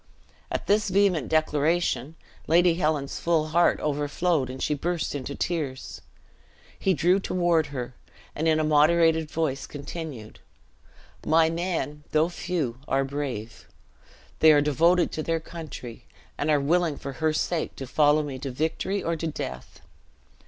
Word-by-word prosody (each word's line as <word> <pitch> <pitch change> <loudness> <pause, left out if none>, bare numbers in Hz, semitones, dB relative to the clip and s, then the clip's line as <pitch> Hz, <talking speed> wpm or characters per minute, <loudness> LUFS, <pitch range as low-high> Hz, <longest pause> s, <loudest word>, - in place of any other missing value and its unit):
At - - -3
this 210 0 +2
vehement 185 -7 +2
declaration, 155 0 +1 0.3
Lady 175 +2 +5
Helen's 155 -4 -1
full 160 -2 +1
heart 170 +2 +3
overflowed, 150 0 0
and 130 +1 -7
she 150 - 0
burst 170 +3 -2
into 140 0 -5
tears. 150 -7 -3 0.8
He 190 -2 +2
drew 175 +6 +3
toward 175 -4 +1
her, 130 -3 -6 0.4
and 160 +2 -1
in 155 -1 +3
a - - +1
moderated 160 +1 +3
voice 150 -5 -2
continued: 145 -6 -8 0.8
"My 160 +1 +3
men, 165 -4 -3
though 155 +2 +3
few, 170 -9 -3
are 135 0 +1
brave. 135 -6 -5 0.7
They 160 - +7
are 150 - +6
devoted 165 +5 +3
to 155 - -3
their 165 +1 -1
country, 155 -8 -9 0.3
and 145 - -2
are 150 -1 +4
willing 160 +1 +1
for 140 - -6
her 160 0 +3
sake 160 +2 -2
to 135 - -6
follow 150 +3 +3
me 135 -3 -6
to 135 - -4
victory 160 +8 -2
or 170 - -1
to 165 +1 -3
death. 65 - -7
155 Hz, 145 wpm, -26 LUFS, 145-170 Hz, 0.8 s, They